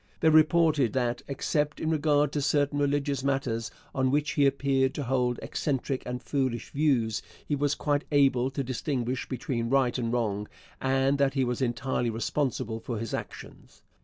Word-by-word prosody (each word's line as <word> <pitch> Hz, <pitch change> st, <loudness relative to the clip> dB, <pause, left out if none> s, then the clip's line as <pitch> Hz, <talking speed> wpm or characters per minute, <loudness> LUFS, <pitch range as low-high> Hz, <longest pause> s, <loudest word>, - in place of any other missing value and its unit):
They 160 Hz, -, +5 dB
reported 155 Hz, -5 st, +4 dB
that, 120 Hz, -2 st, 0 dB
except 150 Hz, +2 st, -1 dB
in 160 Hz, -, -1 dB
regard 150 Hz, -2 st, +2 dB
to 145 Hz, -, -1 dB
certain 145 Hz, 0 st, +1 dB
religious 140 Hz, -1 st, 0 dB
matters 135 Hz, -5 st, -1 dB, 0.2 s
on 130 Hz, -1 st, +1 dB
which 145 Hz, +2 st, +1 dB
he 140 Hz, -2 st, +3 dB
appeared 135 Hz, -1 st, +1 dB
to 145 Hz, -, -2 dB
hold 125 Hz, -1 st, 0 dB
eccentric 135 Hz, -2 st, -2 dB
and 125 Hz, 0 st, -4 dB
foolish 130 Hz, -5 st, -2 dB
views, 125 Hz, -7 st, +1 dB, 0.2 s
he 145 Hz, -, 0 dB
was 145 Hz, +1 st, +1 dB
quite 145 Hz, -1 st, 0 dB
able 135 Hz, -3 st, +3 dB
to 135 Hz, +1 st, -3 dB
distinguish 130 Hz, 0 st, -2 dB
between 120 Hz, -2 st, -2 dB
right 130 Hz, -2 st, +2 dB
and 115 Hz, -2 st, -1 dB
wrong 105 Hz, -4 st, -1 dB, 0.3 s
and 135 Hz, +1 st, +2 dB
that 140 Hz, -1 st, +2 dB
he 135 Hz, -, +2 dB
was 125 Hz, +1 st, -2 dB
entirely 120 Hz, 0 st, 0 dB
responsible 115 Hz, -1 st, -2 dB
for 115 Hz, 0 st, -4 dB
his 115 Hz, +1 st, -5 dB
actions. -, -, -8 dB
135 Hz, 165 wpm, -28 LUFS, 120-145 Hz, 0.3 s, They